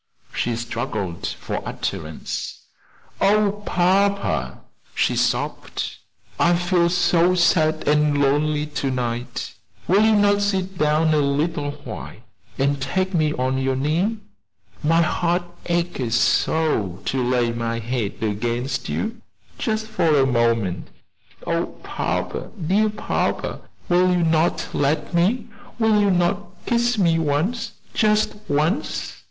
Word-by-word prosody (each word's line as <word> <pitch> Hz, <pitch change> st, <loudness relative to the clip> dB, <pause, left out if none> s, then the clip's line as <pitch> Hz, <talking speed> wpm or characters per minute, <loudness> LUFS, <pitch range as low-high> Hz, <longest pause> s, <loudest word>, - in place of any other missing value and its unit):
She 120 Hz, -, -1 dB
struggled 115 Hz, -, -3 dB
for -, -, -4 dB
utterance. -, -, -5 dB, 0.6 s
"Oh, 205 Hz, 0 st, +3 dB
papa!" 200 Hz, +3 st, +1 dB, 0.3 s
she -, -, +2 dB
sobbed, -, -, -1 dB, 0.4 s
"I 175 Hz, +1 st, +4 dB
feel 175 Hz, 0 st, +2 dB
so 175 Hz, 0 st, +3 dB
sad 155 Hz, -3 st, +2 dB
and 150 Hz, -1 st, +3 dB
lonely 150 Hz, +2 st, +2 dB
to 145 Hz, -2 st, -3 dB
night 120 Hz, -1 st, -3 dB, 0.3 s
will 200 Hz, +4 st, +4 dB
you 220 Hz, 0 st, +5 dB
not 205 Hz, 0 st, +4 dB
sit 190 Hz, -2 st, -1 dB
down 155 Hz, +1 st, +3 dB
a 155 Hz, -, +3 dB
little 145 Hz, +1 st, 0 dB
while -, -, -7 dB, 0.4 s
and 140 Hz, 0 st, +1 dB
take 190 Hz, +7 st, -1 dB
me 155 Hz, -3 st, +2 dB
on 130 Hz, 0 st, 0 dB
your 135 Hz, 0 st, 0 dB
knee? 165 Hz, +11 st, 0 dB, 0.7 s
my 165 Hz, +2 st, +4 dB
heart 175 Hz, +2 st, 0 dB, 0.2 s
aches 170 Hz, -9 st, 0 dB
so 120 Hz, -, +1 dB
to 130 Hz, -1 st, 0 dB
lay 120 Hz, -1 st, +1 dB
my 115 Hz, 0 st, -2 dB
head 115 Hz, -2 st, -2 dB
against 120 Hz, +5 st, -2 dB
you 230 Hz, +1 st, -3 dB, 0.4 s
just 220 Hz, 0 st, -1 dB
for 155 Hz, -10 st, +2 dB
one 130 Hz, -, 0 dB
moment. 115 Hz, -6 st, +1 dB, 0.6 s
Oh, -, -, -2 dB
papa, -, -, -3 dB, 0.2 s
dear 210 Hz, +4 st, +3 dB
papa, 210 Hz, -, -2 dB, 0.3 s
will 180 Hz, +1 st, +4 dB
you 175 Hz, -1 st, +2 dB
not 165 Hz, +1 st, +2 dB
let 150 Hz, +4 st, 0 dB
me 195 Hz, +8 st, +2 dB, 0.3 s
will 220 Hz, -2 st, +3 dB
you 205 Hz, -, +3 dB
not 180 Hz, +2 st, +2 dB, 0.2 s
kiss 240 Hz, 0 st, +1 dB
me 170 Hz, -4 st, +3 dB
once, 165 Hz, +10 st, -1 dB, 0.2 s
just 215 Hz, 0 st, +2 dB
once? 155 Hz, -, 0 dB
160 Hz, 125 wpm, -22 LUFS, 130-190 Hz, 0.7 s, you